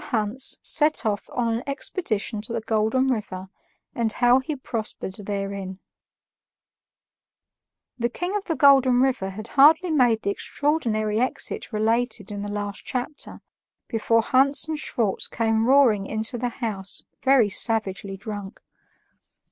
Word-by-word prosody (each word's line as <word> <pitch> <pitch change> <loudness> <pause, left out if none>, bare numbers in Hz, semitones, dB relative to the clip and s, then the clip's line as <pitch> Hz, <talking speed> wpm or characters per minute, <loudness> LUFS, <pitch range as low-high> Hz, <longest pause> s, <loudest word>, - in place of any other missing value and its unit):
HANS 230 +2 -1
SET 305 -4 +1
OFF 205 -2 -1
ON 235 -2 0
AN 240 - -6
EXPEDITION 230 - -3
TO 225 +2 -6
THE 230 - -2
GOLDEN 220 +4 +1
RIVER, 195 -6 -3 0.4
AND 225 -2 0
HOW 245 +1 +4
HE 280 +3 -4
PROSPERED 215 -5 -5
THEREIN 195 -2 -4 2.2
The 235 0 +1
King 355 - -3
of 415 - -2
the 325 - -1
Golden 270 -4 +5
River 255 -7 +1
had 215 +4 -8
hardly 315 +5 +5
made 245 -7 +3
the 200 - +1
extraordinary 220 -6 -1
exit 255 -1 -2
related 220 -1 0
in 205 -1 -5
the 205 - -4
last 205 -1 -4
chapter, 255 +4 -5 0.5
before 230 0 +1
Hans 275 +5 +3
and 315 -1 -3
Schwartz 225 -9 -1
came 225 0 0
roaring 245 -8 +4
into 220 +2 -3
the 245 +1 -1
house 210 -6 -4 0.2
very 260 -6 +4
savagely 200 -2 -1
drunk. 205 -1 -7
230 Hz, 135 wpm, -24 LUFS, 210-265 Hz, 2.2 s, Golden